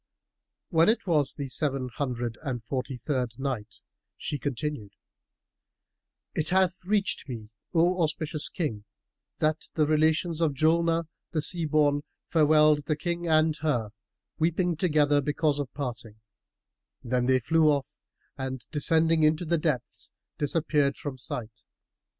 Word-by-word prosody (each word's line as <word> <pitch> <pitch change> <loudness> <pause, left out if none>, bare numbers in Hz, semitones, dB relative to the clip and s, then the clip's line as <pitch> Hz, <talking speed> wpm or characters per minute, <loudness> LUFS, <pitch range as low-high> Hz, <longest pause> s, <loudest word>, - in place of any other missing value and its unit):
When 165 +2 +4
it 225 - +1
was 150 -7 +2
the 140 - -4
Seven 135 -1 0
Hundred 120 -4 -2
and 125 -6 -4
Forty 130 +2 -4
third 125 -3 -2
Night, 125 -6 -4 0.4
She 145 - -4
continued, 135 -5 -4 1.4
It 155 - -1
hath 185 0 +2
reached 200 -6 0
me, 110 -3 -7 0.2
O 175 +2 +3
auspicious 155 -1 0
King, 110 - -3 0.5
that 155 0 0
the 155 - +3
relations 155 +2 +2
of 155 -4 +1
Julnar 165 +2 +2 0.3
the 155 - +1
Sea 170 +1 +3
born 145 -1 +2 0.2
farewelled 150 -2 +4
the 155 - 0
King 170 +2 -3
and 155 -1 +3
her, 125 -9 -1 0.5
weeping 170 +2 +1
together 150 -3 +3
because 145 +1 0
of 140 -3 -3
parting; 115 -6 -6 0.8
then 125 0 0
they 130 0 +4
flew 155 +5 +3
off 140 -3 0 0.5
and 130 -1 -4
descending 160 +1 +2
into 155 +3 +3
the 170 0 +1
depths 150 -6 -3 0.3
disappeared 145 -2 +1
from 135 -3 -6
sight. 115 -2 -6
150 Hz, 130 wpm, -27 LUFS, 130-160 Hz, 1.4 s, When